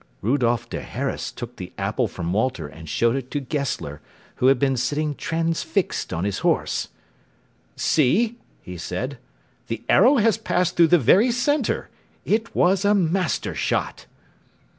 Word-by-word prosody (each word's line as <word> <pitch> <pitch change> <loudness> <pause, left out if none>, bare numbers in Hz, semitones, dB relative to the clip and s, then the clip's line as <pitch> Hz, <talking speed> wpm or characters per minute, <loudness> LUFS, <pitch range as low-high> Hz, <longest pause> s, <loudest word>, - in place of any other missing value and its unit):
Rudolph 120 0 +1
der - - -5
Harras 135 +3 -4
took 120 0 -8
the 90 -1 -8
apple 105 +5 0
from 85 -1 -4
Walter 110 - 0
and 80 +2 -11
showed 115 - +2
it 130 -2 -4
to 145 - -2
Gessler, 135 - -3 0.4
who 125 - +3
had 135 0 +5
been 135 +1 +1
sitting 145 +4 -1
transfixed 165 +3 -1
on 85 -1 -2
his 100 -1 -1
horse. - - 0 0.9
"See," 215 - +2 0.2
he 90 0 -8
said, 120 +11 -4 0.5
"the 115 - -4
arrow 250 +9 +6
has 225 -3 +3
passed 180 -4 0
through 170 -1 +6
the 175 - +5
very 185 - +4
centre. 250 +2 0 0.4
It 225 +2 0
was 185 +2 +3
a 205 +1 +4
master 180 -1 0
shot." - - -2
140 Hz, 150 wpm, -23 LUFS, 115-180 Hz, 0.9 s, arrow